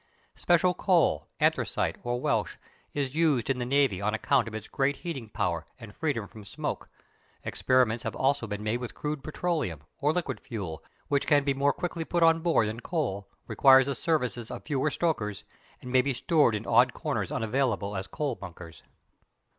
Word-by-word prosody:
Special 175 +1 +3
coal, 180 -2 +2
anthracite - - +1
or 120 0 -2
Welsh, - - 0 0.4
is 140 -3 -2
used 150 -6 +2
in 130 - -2
the 120 - -2
navy 135 -8 +2
on 105 +2 0
account 125 +1 +2
of 110 - -6
its 110 -1 -6
great 140 +1 0
heating 135 -10 -4
power 90 -7 -1 0.2
and 115 -4 -11
freedom 135 -10 -2
from 110 +1 -12
smoke; 100 - -5 0.5
experiments 125 -3 +1
have - - -4
also 135 -3 +1
been 105 0 -5
made 110 +3 0
with 125 -1 -6
crude 150 -2 -4
petroleum, 150 - -2 0.2
or 145 +1 +2
liquid 150 -9 -2
fuel, 90 -9 -6 0.2
which 140 -1 0
can 145 -2 +4
be 140 -1 +1
more 140 +1 +2
quickly 170 -1 -4
put 170 +1 0
on 165 0 +5
board 160 -10 +2
than 110 +2 -4
coal, 125 - -3 0.2
requires 135 -1 +6
the 140 - -1
services 125 -5 -1
of 120 - -7
fewer 145 0 0
stokers, 115 - -1 0.4
and 125 - -7
may 130 0 +5
be 135 0 -1
stored 145 - +3
in 105 - -4
odd - - +4
corners - - -3
unavailable 110 -3 -1
as 95 0 -4
coal 145 +5 -2
bunkers. 85 -5 -10
130 Hz, 180 wpm, -28 LUFS, 110-150 Hz, 0.5 s, requires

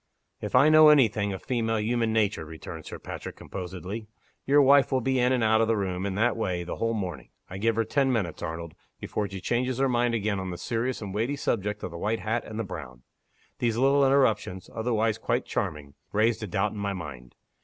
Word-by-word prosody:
"If 105 - -3
I 130 +4 +7
know 155 0 +8
any 145 -5 +7
thing 105 -1 -2
of 95 - -6
female 115 -3 0
human 115 +1 0
nature," 105 -6 +1
returned 80 0 -9
Sir - - -6
Patrick, - - -7
composedly, 95 +4 -6 0.4
"your 145 +2 +5
wife 140 0 +5
will 130 - +3
be 130 +1 0
in 125 +1 +3
and 125 -3 +2
out 110 0 +4
of 115 - +2
the 115 -1 +2
room, 95 -1 -2
in 95 - -3
that 115 +3 +2
way, 90 -6 -2
the 85 - -5
whole 115 0 0
morning. 95 -5 -5 0.2
I 95 - -5
give 115 +2 +1
her 115 - +2
ten 135 +4 +1
minutes, 100 -9 -2
Arnold, 85 -1 -5 0.3
before 105 -2 -3
she 95 -1 -6
changes 120 +6 -1
her 135 0 +2
mind 120 -1 +1
again 105 -2 -1
on 95 0 -4
the 90 - -5
serious 120 +4 -2
and 95 -2 -6
weighty 115 +7 0
subject 105 -6 -2
of 90 - -4
the 85 - -7
white 110 +4 -1
hat 110 +2 -1
and 110 - -7
the 115 - -1
brown. 65 - -8 0.6
These 115 -2 0
little 135 +2 +4
interruptions 120 -9 +1
otherwise 110 -1 0
quite - - -1
charming 70 -2 -3 0.2
raised 110 +2 +2
a 105 - -4
doubt 95 +3 0
in 105 - -7
my 100 -1 -1
mind. 70 -9 -8
110 Hz, 225 wpm, -27 LUFS, 95-120 Hz, 0.6 s, know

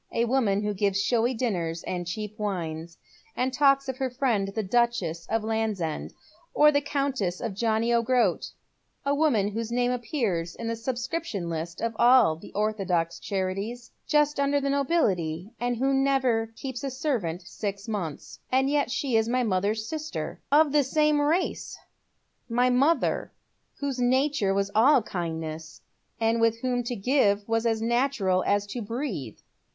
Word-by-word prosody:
" - - -41
A - - +3
woman 225 -5 +1
who 210 0 -1
gives 195 0 +1
showy 240 +4 +1
dinners 175 -9 -2
and 175 -1 -4
cheap 215 +3 -5
wines, 170 -5 -4 0.4
and 255 +1 -1
talks 275 -1 +3
of 260 -1 -3
her 265 -1 -1
friend 245 -6 0
the 210 +2 -3
Duchess 190 -7 0
of 225 0 0
Landsend, 215 -7 -2 0.4
or 300 0 +6
the 285 -1 +2
Countess 270 -11 -1
of 230 -5 -3
John 220 +2 0
o' 235 0 +3
Groat; 230 -6 +1 0.6
a 280 - +2
woman 280 -10 +2
whose 225 +2 -4
name 245 +1 +1
appears 225 - -2
in 230 - -5
the 230 - -1
subscription 240 - -3
list 165 +1 -5
of 230 -1 -2
all 245 -10 +6
the 160 - -13
orthodox 190 -6 -1
charities, 200 +5 -3 0.2
just 295 -1 +2
under 280 0 +2
the 275 0 -1
nobility, 200 - 0
and 245 0 -1
who 270 +3 +1
never 260 -5 +1
keeps 260 +1 -6
a 275 - -1
servant 245 - -2
six 200 +2 -5
months. 185 -9 -5
And 265 +2 +2
yet 290 -3 +1
she 265 -1 -1
is 220 +1 +1
my 250 +1 +1
mother's 210 +1 0
sister, 310 +2 -5
of 300 0 +5
the 295 0 +4
same 300 +2 +2
race; 325 +5 -1 0.7
my 245 +2 +2
mother, 275 +4 +1 0.4
whose 275 -3 -3
nature 255 -3 +2
was 200 0 0
all 250 +3 +5
kindness, 160 -3 -5 0.4
and 225 0 +1
with 230 0 +2
whom 250 -1 0
to 245 - -2
give 205 -3 +2
was 225 +1 +1
as 225 -1 0
natural 235 -6 +1
as 205 0 +2
to 235 +4 -5
breathe." 210 - -4
230 Hz, 165 wpm, -26 LUFS, 195-265 Hz, 0.7 s, or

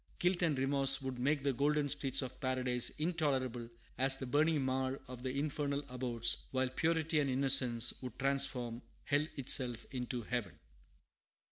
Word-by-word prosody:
Guilt 180 -1 0
and 160 -5 +1
remorse 135 0 +2
would 130 -2 -5
make 140 +2 0
the 140 -1 +1
golden 145 +3 +1
streets 135 -1 0
of 130 - -9
Paradise 125 -2 +1
intolerable 135 -8 -1 0.3
as 135 +1 +4
the 135 - -6
burning 150 +4 +2
marl 130 0 -1
of 125 -1 -9
the 130 - -3
infernal 145 -1 -2
abodes; 125 -2 0
while 130 -1 -1
purity 160 +3 0
and 140 -2 0
innocence 130 -3 +4
would 125 -2 -8
transform 130 -3 0 0.2
hell 145 +2 +1
itself 125 -3 +4
into 125 -2 -4
heaven. 115 -7 -4
135 Hz, 150 wpm, -34 LUFS, 125-145 Hz, 0.3 s, as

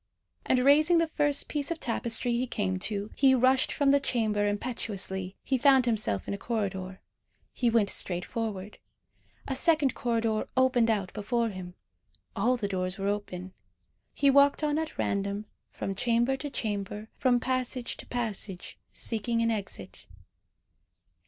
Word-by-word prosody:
And 255 - +3
raising 310 +5 +5
the 330 0 +3
first 290 -2 +1
piece 285 -2 -2
of 335 -1 -3
tapestry 235 +1 0
he 240 +2 0
came 185 -5 -1
to, 205 +1 -3
he 265 -1 +5
rushed 255 +1 +3
from 285 -2 +2
the 280 - +5
chamber 215 -6 +1
impetuously. 200 -4 -3
He 265 -2 0
found 265 -1 +5
himself 215 - 0
in - - -2
a 200 - -5
corridor. 190 -4 -3 0.5
He 245 - +1
went 225 -4 +2
straight 180 -1 -1
forward. 210 -3 -5 0.7
A 270 - -2
second 305 -2 +3
corridor 230 -3 -1
opened 255 -3 +4
out 200 -4 0
before 230 +2 -1
him. 185 -3 -8 0.6
All 245 +5 +2
the 210 -4 -2
doors 185 -1 -2
were 195 0 -1
open. 190 -3 -4 0.6
He 280 -1 +3
walked 280 +2 +4
on 300 0 +1
at 320 -1 -5
random, 200 +1 -1 0.2
from 195 - -4
chamber 240 +5 +1
to 290 +2 -5
chamber, 210 -3 -4
from 250 -2 +3
passage 255 -1 -2
to - - -9
passage, 215 -6 -4
seeking 230 +1 -2
an 230 - +2
exit. 190 - -6
230 Hz, 150 wpm, -28 LUFS, 200-260 Hz, 0.7 s, raising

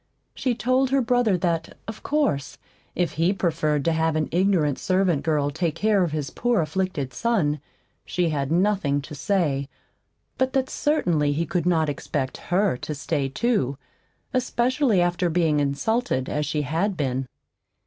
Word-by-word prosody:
She 255 -3 -1
told 255 +2 +2
her 275 +1 +3
brother 245 -5 +2
that, 170 -2 -2
of 220 -1 -7
course, 215 - 0 0.4
if 175 -4 0
he 165 +4 +1
preferred 155 -6 0
to 165 - +3
have 160 0 +1
an 155 -1 0
ignorant 175 -5 +2
servant 185 -5 +1
girl 150 -3 +1
take 160 +1 -1
care 210 -2 +2
of 170 - -1
his 150 -2 -3
poor 240 -3 +1
afflicted 155 -5 -2
son, 150 - 0 0.4
she 180 -2 0
had 140 -2 -2
nothing 170 -6 +1
to 145 - -9
say; 145 -5 0 0.7
but 260 0 +1
that 265 -1 0
certainly 170 - +1
he 165 +3 -1
could 175 -1 -1
not 160 -3 +3
expect 140 -2 -3
HER 185 -5 +2
to 150 - -5
stay, 140 -1 -1
too, 140 - 0 0.6
especially 255 -3 +2
after 175 0 +1
being 160 -3 +2
insulted 145 - 0
as 150 -1 -1
she 150 0 -1
had 170 +8 -1
been. 130 -3 -1
170 Hz, 160 wpm, -24 LUFS, 145-205 Hz, 0.7 s, her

